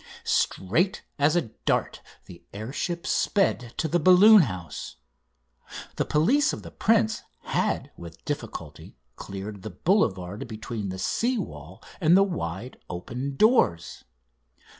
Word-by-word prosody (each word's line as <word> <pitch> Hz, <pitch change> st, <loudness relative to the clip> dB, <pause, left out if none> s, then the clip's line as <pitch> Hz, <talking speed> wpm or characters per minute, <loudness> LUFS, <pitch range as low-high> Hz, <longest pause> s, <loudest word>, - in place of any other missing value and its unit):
Straight 145 Hz, -, 0 dB, 0.2 s
as 145 Hz, +3 st, +3 dB
a 175 Hz, -, +2 dB, 0.2 s
dart -, -, 0 dB, 0.2 s
the 85 Hz, -, -13 dB
air 110 Hz, +6 st, -6 dB
ship 170 Hz, +2 st, -3 dB
sped 130 Hz, -, 0 dB
to 160 Hz, -, 0 dB
the 175 Hz, +3 st, +1 dB
balloon 185 Hz, +5 st, +8 dB
house. 90 Hz, -, -5 dB, 1.0 s
The -, -, 0 dB
police 265 Hz, -, +2 dB
of -, -, -6 dB
the -, -, -10 dB
prince 220 Hz, 0 st, +2 dB, 0.2 s
had -, -, -1 dB
with 85 Hz, -1 st, -12 dB
difficulty -, -, -6 dB, 0.2 s
cleared 100 Hz, +1 st, -7 dB
the 110 Hz, -, -6 dB
boulevard 100 Hz, -, 0 dB
between 110 Hz, -2 st, -5 dB
the 95 Hz, -, -5 dB
sea 240 Hz, -, 0 dB
wall 80 Hz, -, -8 dB, 0.2 s
and 170 Hz, +3 st, +5 dB
the 195 Hz, -, +6 dB
wide 120 Hz, -, -4 dB
open 125 Hz, +10 st, -5 dB
doors. 210 Hz, -, +2 dB
125 Hz, 130 wpm, -26 LUFS, -, 1.0 s, balloon